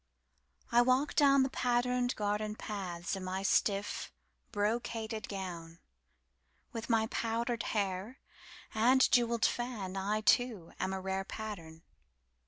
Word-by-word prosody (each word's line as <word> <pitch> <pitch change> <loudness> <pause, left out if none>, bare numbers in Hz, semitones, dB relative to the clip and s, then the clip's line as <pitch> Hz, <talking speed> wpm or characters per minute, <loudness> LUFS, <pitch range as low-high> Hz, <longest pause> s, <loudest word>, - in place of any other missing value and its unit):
I 240 +1 +6
walk 255 +4 +2
down 275 -2 +5
the 265 - 0
patterned 245 0 +1
garden 210 0 -1
pathsIn 190 -3 -4
my 185 +1 -3
stiff, 200 +1 +1 0.4
brocaded 220 +1 -2
gown. 175 -4 -6 1.0
With 230 0 -5
my 225 -1 +3
powdered 230 +1 -1 0.2
hair 200 +5 -2 0.6
and 245 +4 +4
jewelled 235 -2 +3
fan,I 210 -4 -1
too 215 -6 +2
am 190 - -1
a 190 - -2
rarePattern. 190 -3 -5
215 Hz, 105 wpm, -33 LUFS, 190-240 Hz, 1.0 s, I